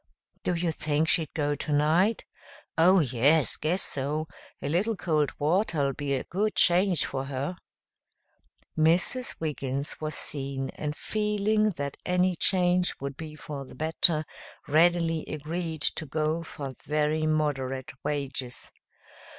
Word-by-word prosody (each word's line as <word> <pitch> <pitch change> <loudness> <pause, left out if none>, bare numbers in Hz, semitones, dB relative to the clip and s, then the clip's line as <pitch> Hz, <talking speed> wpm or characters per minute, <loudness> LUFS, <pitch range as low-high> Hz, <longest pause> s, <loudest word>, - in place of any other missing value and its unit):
"Do 180 - 0
you 170 0 0
think 155 0 0
she'd 160 -4 +1
go 145 -1 +1
tonight?" 155 +9 +2 0.5
"Oh, 180 +3 +6
yes! 140 +3 +3
Guess 175 +5 0
so. 150 +3 -1 0.3
A - - -4
little 190 +9 +1
cold 155 -6 +1
water'll 155 -3 +1
be 140 -1 -2
a 130 - -2
good 210 +4 -1
change 180 -1 +4
for 135 0 -3
her." 140 +5 -3 1.2
Mrs. 175 +11 +2
Wiggins 140 -3 -3
was 155 -1 -3
seen, 135 -2 -2
and 150 -1 -4
feeling 210 +1 +1
that 140 -2 -4
any 180 0 +2
change 180 0 +2
would 140 0 -5
be 155 0 -8
for 145 -2 -7
the 130 - -13
better, 155 0 +2 0.4
readily 165 +1 +3
agreed 160 +1 -4
to 160 - 0
go 155 +3 0
for 140 -4 -7
very 150 +1 +1
moderate 135 -4 -1
wages. 135 -4 -3
155 Hz, 130 wpm, -28 LUFS, 145-175 Hz, 1.2 s, Oh